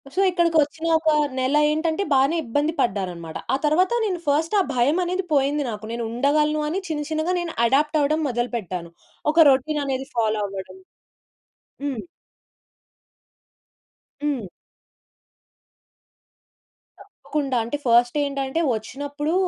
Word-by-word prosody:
So 390 - +2
ఇక్కడికొచ్చిన 330 -2 +1
ఒక 320 0 +1 0.3
నెల 260 +3 +1 0.2
ఏంటంటే 320 +4 0
బానే 275 +5 +3
ఇబ్బంది 290 +7 0
పడ్డారన్నమాట. 180 -6 -2 0.2
ఆ - - +4
తరువాత 355 +7 +3
నేను 370 -4 -2
ఫస్ట్ 310 +6 +1
ఆ - - +5
భయమనేది 350 +9 +1
పోయింది 285 +1 +2
నాకు. 215 -1 -6
నేనుండగలను 280 +7 +1
అని 355 +6 -1
చిన్న 305 -2 -2
చిన్నగా 315 +3 0
నేను 345 -2 -4
అడాప్ట్ 295 +5 +2
అవ్వడం 310 +3 +1
మొదలుపెట్టాను. 225 -8 -3 0.4
ఒక 325 -1 +6
రొటీన్ 290 +3 +1
అనేది 265 0 -3
ఫాలో 220 -2 +1
అవ్వడం. 190 -1 -8 1.1
హ్మ్. 270 -6 -2 2.2
హ్మ్. 270 -9 -1 2.5
తప్పకుండా. 280 -4 -4
అంటే 235 +6 -3
ఫస్ట్ 240 +2 +4
ఏంటంటే 275 +2 -2 0.2
వచ్చినప్పుడు, 285 +7 -4
285 Hz, 110 wpm, -23 LUFS, 240-315 Hz, 2.5 s, ఒక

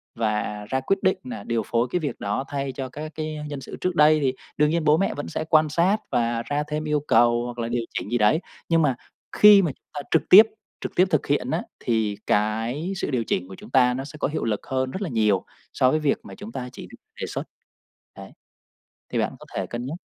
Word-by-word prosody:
và 105 -2 -2
ra 130 - +1
quyết 195 +9 +1
định 190 0 +3
là 115 -5 -7
điều 115 0 -1
phối 115 +1 +1
cái 180 - +1
việc 150 -4 -4
đó 105 +6 -2
thay 140 -1 -3
cho 130 0 -5
các 150 +4 -7
cái 155 -1 -4
nhân 145 -2 -5
sự - - -8
trước 180 -1 -1
đây 155 0 +6
thì 130 -2 +1 0.2
đương 150 0 +4
nhiên 165 +1 0
bố 150 +1 +5
mẹ 195 - 0
vẫn 145 - -5
sẽ - - -3
quan 155 -1 +4
sát 175 +7 +2
và 120 -2 0
ra 145 +1 -1
thêm 150 0 -3
yêu 150 -1 +1
cầu 120 0 +4
hoặc 120 0 -6
là 115 - -1
điều 120 0 -1
chỉnh - - -4
gì 120 - +2
đấy, 110 +9 +3 0.3
nhưng 165 -1 +4
mà 140 -5 +2 0.4
khi 210 -1 +9
mà 170 -6 0
chúng - - -23
ta 145 - -4
trực 160 - +4
tiếp 205 +4 +11 0.4
trực - - -4
tiếp 180 - +5
thực 155 - +1
hiện 140 -3 0
á, - - 0 0.2
thì 110 -3 0
cái 115 - 0
sự 185 - -2
điều 125 -3 0
chỉnh 90 -4 -2
của 95 - -10
chúng - - -12
ta 125 -2 +4
nó 130 +2 -3
sẽ 150 +2 -10
có - - +1
hiệu 150 +3 -3
lực 105 -3 -2
hơn 130 0 -1
rất 190 - -5
là 195 - -2
nhiều 105 -5 +1 0.3
so 130 - +3
với 155 - +2
việc 150 -2 +1
mà - - -10
chúng 210 +2 -9
ta 125 - -5
chỉ - - -9
v - - -11 0.3
đề - - -2
xuất. - - -4 0.7
Đấy, - - -10 0.8
thì - - 0
bạn - - -1
có - - -14
thể - - -1
cân 120 +1 -5
nhắc. 150 +5 -4
135 Hz, 255 wpm, -24 LUFS, 115-155 Hz, 0.8 s, tiếp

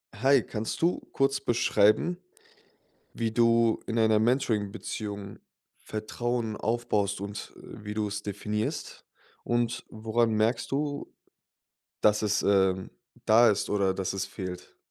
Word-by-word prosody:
Hi, 135 0 +4
kannst 110 0 -4
du 170 +2 +1
kurz 135 -1 +2
beschreiben 120 - +2 1.0
wie 115 -1 -1
du 115 0 +3
in 115 - -2
einer 110 -1 +4
Mentoring-Beziehung 105 -4 -2 0.4
Vertrauen 115 +1 -3
aufbaust 105 -4 0
und, 100 0 -6
äh, - - -11
wie 105 - -4
du's 105 -1 -2
definierst? 105 +1 -4 0.4
Und 120 0 -1
woran 110 +1 0
merkst 110 +3 +1
du 145 +1 -2 0.9
dass 105 0 +4
es, 105 -1 +1
ähm, 95 -2 +2 0.3
da 115 +1 +6
ist 100 - -1
oder 100 -2 +2
dass 95 -1 -2
es 95 -1 -2
fehlt? 90 -2 -7
110 Hz, 120 wpm, -28 LUFS, 100-120 Hz, 1.0 s, da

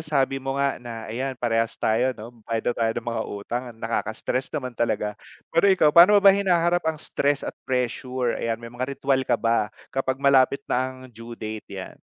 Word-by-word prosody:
sabi 135 -2 0
mo 135 +1 -3
nga, 140 -2 0
na 115 -2 -7
ayan, 130 +2 -3
parehas 115 -1 0
tayo 120 +4 +1
'no, 115 +3 -9 0.2
bayad 115 +1 0
na - - -16
tayo 115 -1 +1
ng 120 - -3
mga 115 -1 -1
utang. 105 +4 -4
Ang 110 - -23
nakaka-stress 115 +3 -2
naman 130 -4 -3
talaga. 105 -2 0 0.4
Pero 200 +4 +4
ikaw, 155 -6 +4
paano 180 +5 +8
mo - - +5
ba 195 - +10
hinaharap 175 -3 +2
ang 160 - -1
stress 145 0 -1
at - - -6
pressure? 125 -1 -1
Ayan, 115 -1 -1
may 115 0 -9
mga 130 +3 -4
ritwal 135 -1 +1
ka - - +3
ba, 115 -2 +1 0.2
kapag 130 -1 -1
malapit 140 0 +4
na 130 +1 0
ang 130 - -14
due 115 +1 -10
date, 110 0 -7
yan? 95 -1 -7
125 Hz, 205 wpm, -24 LUFS, 115-140 Hz, 0.4 s, ba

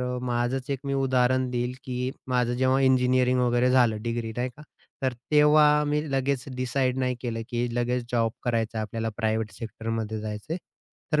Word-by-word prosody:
अ, 125 0 -2
माझंच 125 +2 -1
एक 140 - -1
मी 140 - 0
उदाहरण 130 -1 +2
देईल, 125 0 -1
की 125 -1 -2 0.2
माझं 125 -1 +1
जेव्हा 130 +1 +3
इंजिनिअरिंग 130 -1 +3
वगैरे 125 0 +3
झालं, 120 -4 +3
डिग्री 115 -1 -3
नाही 125 +1 0
का. 150 - -12 0.4
तर 130 -1 +1 0.2
तेव्हा 150 0 +6
मी 150 0 +1
लगेच 135 -1 0
डिसाईड 130 +1 0
नाही 130 -1 0
केलं, 115 -3 -3
की 120 0 -1
लगेच 120 0 0
जॉब 115 -2 +2
करायचा 115 -2 -1
आहे, - - 0
आपल्याला 115 +1 -3
प्रायव्हेट 110 -1 0
सेक्टरमध्ये 110 0 -4
जायचंय. 105 +9 -4 0.6
तर 150 - +4
125 Hz, 170 wpm, -26 LUFS, 115-130 Hz, 0.6 s, तेव्हा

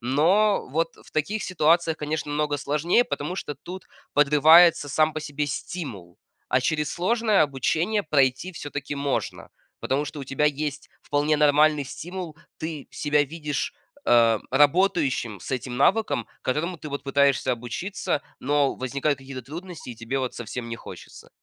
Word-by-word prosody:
Но 175 - +2
вот 165 +4 -1
в - - -19
таких 195 +8 -1
ситуациях, 165 -1 +2
конечно, 150 0 -3
намного 145 0 0
сложнее, 150 - +2
потому 150 +3 -4
что 145 - -4
тут 185 +4 -10 0.3
подрывается 150 +2 +6
сам 155 +2 +2
по 155 - -4
себе 145 0 -3
стимул. 115 - -6 0.3
А 130 - +2
через 150 +2 -1
сложное 215 +1 +2
обучение 160 - 0
пройти 140 +2 +1
всё-таки 145 -4 -6
можно, 140 -1 -3 0.3
потому 140 +3 -1
что 150 - -7
у 140 - -5
тебя 135 +3 -1
есть 145 0 -3
вполне 145 +1 +1
нормальный 150 0 +4
стимул. 175 +2 -7 0.2
Ты 160 -3 -6
себя 150 0 +1
видишь, 150 - -3 0.3
а, 115 -2 +4
работающим 145 - +2
с 115 - -7
этим 125 -1 -3
навыком, 145 - +2 0.2
которому 165 +7 -2
ты 150 - -7
вот 140 -1 -5
пытаешься 140 -2 +2
обучиться, 125 - -3 0.2
но 145 -1 +1
возникают 140 +3 -1
какие-то 130 -1 -8
трудности, 165 +1 -8
и - - -8
тебе 115 +4 -3
вот 130 -2 -3
совсем 120 +1 -6
не 115 - -4
хочется. - - -12
145 Hz, 150 wpm, -25 LUFS, 135-165 Hz, 0.3 s, подрывается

